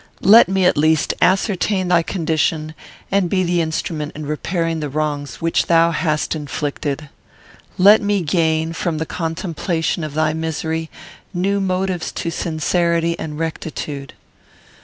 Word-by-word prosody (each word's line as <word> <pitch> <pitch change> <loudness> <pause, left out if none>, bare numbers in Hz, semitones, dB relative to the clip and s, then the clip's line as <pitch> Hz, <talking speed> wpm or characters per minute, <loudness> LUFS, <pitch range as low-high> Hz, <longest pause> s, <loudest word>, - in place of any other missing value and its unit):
Let 215 0 +8
me, 190 -1 +2
at 180 - +3
least, 155 0 +2
ascertain 190 0 +2
thy 175 -2 +4
condition, 160 -2 -1 0.4
and 195 -3 +2
be 185 0 +1
the 175 -1 +1
instrument 160 -2 -3
in 155 0 -6
repairing 165 +2 -2
the 150 -1 -3
wrongs 145 -1 -3
which 165 0 +1
thou 170 0 +4
hast 155 -3 0
inflicted. 145 0 -4 0.7
Let 205 +4 +7
me 205 -1 +1
gain, 160 0 +1
from 170 -1 -2
the 160 - -2
contemplation 165 0 -2
of 150 -1 -5
thy 155 0 +1
misery, 160 0 -3 0.5
new 195 +3 +1
motives 185 -2 -1
to 170 - -3
sincerity 170 +1 0
and 150 -1 -5
rectitude." 155 -3 -5
165 Hz, 135 wpm, -19 LUFS, 155-180 Hz, 0.7 s, Let